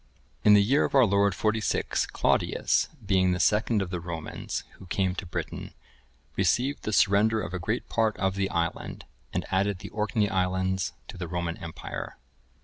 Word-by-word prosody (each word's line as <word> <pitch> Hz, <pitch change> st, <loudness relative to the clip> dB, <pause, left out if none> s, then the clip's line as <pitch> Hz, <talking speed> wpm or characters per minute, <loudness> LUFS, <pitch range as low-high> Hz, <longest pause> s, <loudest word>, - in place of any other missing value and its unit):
[I, -, -, -37 dB
2.] -, -, +4 dB
In -, -, +9 dB
the 100 Hz, -, +6 dB
year 135 Hz, +8 st, +3 dB
of -, -, -1 dB
our 130 Hz, -2 st, +7 dB
Lord, 100 Hz, -1 st, +2 dB
46, 110 Hz, 0 st, 0 dB
Claudius, -, -, +1 dB, 0.2 s
being 95 Hz, -1 st, +3 dB
the 90 Hz, -, -2 dB
second 105 Hz, +1 st, +2 dB
of 90 Hz, -, -7 dB
the 90 Hz, -, -2 dB
Romans 85 Hz, -2 st, -5 dB, 0.2 s
who 95 Hz, -, -12 dB
came 95 Hz, 0 st, 0 dB
to 95 Hz, 0 st, -6 dB
Britain, -, -, -5 dB, 0.6 s
received 135 Hz, +4 st, +1 dB
the 110 Hz, -, -1 dB
surrender 105 Hz, +2 st, +4 dB
of 100 Hz, -, -4 dB
a 90 Hz, -, -2 dB
great 110 Hz, +7 st, -2 dB
part 110 Hz, -2 st, +1 dB
of 95 Hz, -1 st, +1 dB
the 95 Hz, 0 st, -1 dB
island, 85 Hz, 0 st, -3 dB, 0.3 s
and -, -, -2 dB
added 95 Hz, +1 st, +1 dB
the -, -, -9 dB
Orkney 105 Hz, 0 st, 0 dB
islands 95 Hz, -1 st, 0 dB, 0.2 s
to -, -, -8 dB
the 90 Hz, -, -3 dB
Roman 85 Hz, 0 st, -2 dB
empire. 85 Hz, -1 st, -7 dB
95 Hz, 185 wpm, -27 LUFS, 90-105 Hz, 0.6 s, In